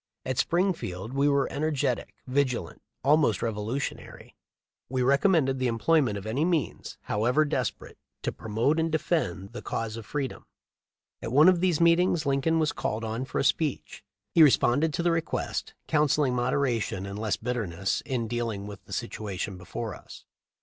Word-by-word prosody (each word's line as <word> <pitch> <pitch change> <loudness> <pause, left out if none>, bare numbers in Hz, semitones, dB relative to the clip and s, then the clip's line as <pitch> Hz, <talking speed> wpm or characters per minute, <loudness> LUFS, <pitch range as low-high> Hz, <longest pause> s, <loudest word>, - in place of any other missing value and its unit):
At 130 -1 -2
Springfield 160 - -1
we 140 +1 +3
were 140 -2 +2
en 140 - -4
ergetic, 145 -5 -1
vigilant, 125 -8 -1 0.2
almost 145 -7 +3
revolutionary. 115 +4 -4 0.5
We 130 0 -1
recom 140 +9 +4
mended 135 -5 +2
the 130 - +1
employment 115 0 +2
of 100 - -7
any 120 +7 0
means, 165 -4 -1
however 125 +9 +1
desperate, 130 -5 -3 0.2
to - - 0
promote 115 +9 0
and 160 0 0
defend 130 - -1
the 120 - -6
cause 115 -1 -3
of 110 -2 -9
free 140 +1 -1
dom. - - -13 0.7
At 115 - -4
one 150 +6 +6
of 185 -2 +5
these 180 -4 +2
meetings 170 -1 +3
Lincoln 140 +4 +2
was 155 -2 +2
called 110 +2 -3
on 115 +3 -3
for - - -5
a - - +2
speech. 135 0 -1 0.3
He 165 - +6
responded 150 +1 +5
to 170 - -1
the 175 - +3
request, 165 -1 -2
counselling 150 -3 +2
moderation 120 -5 0
and 100 +1 -6
less 110 -2 0
bitterness 105 -7 -2
in 120 -4 -2
deal 120 0 -1
ing 100 -2 -5
with 100 -1 -9
the - - -9
situation 105 -4 -4
before 90 -1 -5
us. - - -12
130 Hz, 170 wpm, -27 LUFS, 110-155 Hz, 0.7 s, one